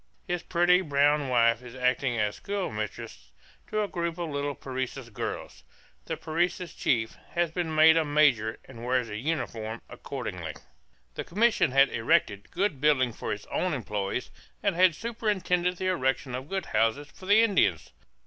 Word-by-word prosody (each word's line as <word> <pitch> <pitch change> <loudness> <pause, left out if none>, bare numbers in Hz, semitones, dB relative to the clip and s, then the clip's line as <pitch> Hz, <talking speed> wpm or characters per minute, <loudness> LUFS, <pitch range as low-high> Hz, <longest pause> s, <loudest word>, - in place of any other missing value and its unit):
His 175 -2 -1
pretty 180 +1 +3
brown 145 -3 +2
wife 115 -1 +3
is 125 0 -11
acting 125 -1 +1
as 105 -2 0
schoolmistress 110 - -5 0.4
to 215 0 0
a - - -2
group 170 -2 -3
of 170 -3 -3
little 140 0 -2
Parecis 130 -1 -5
girls. 105 - -6 0.4
The - - -3
Parecis 175 +2 -1
chief 110 -3 0 0.2
has 170 -2 +1
been 165 -2 -2
made 160 +1 +7
a 165 - +4
major 145 -8 +3
and 120 -3 -11
wears 125 -1 0
a 105 - -4
uniform 115 -5 -3
accordingly. 90 - -6 0.6
The - - -4
commission 220 - +2
has 135 0 +6
erected 100 -3 +1
good 180 -7 -1
buildings 130 -6 +3
for - - -4
its 105 - -5
own 180 -4 0
employees 105 -5 -3 0.3
and - - +1
has 180 -2 +4
superintended 190 -6 0
the 185 - -4
erection 135 -5 0
of 130 +4 -5
good 195 -1 -2
houses 115 +6 +1
for 185 - -12
the 210 +3 +6
Indians. 205 -4 +2
140 Hz, 160 wpm, -28 LUFS, 115-175 Hz, 0.6 s, made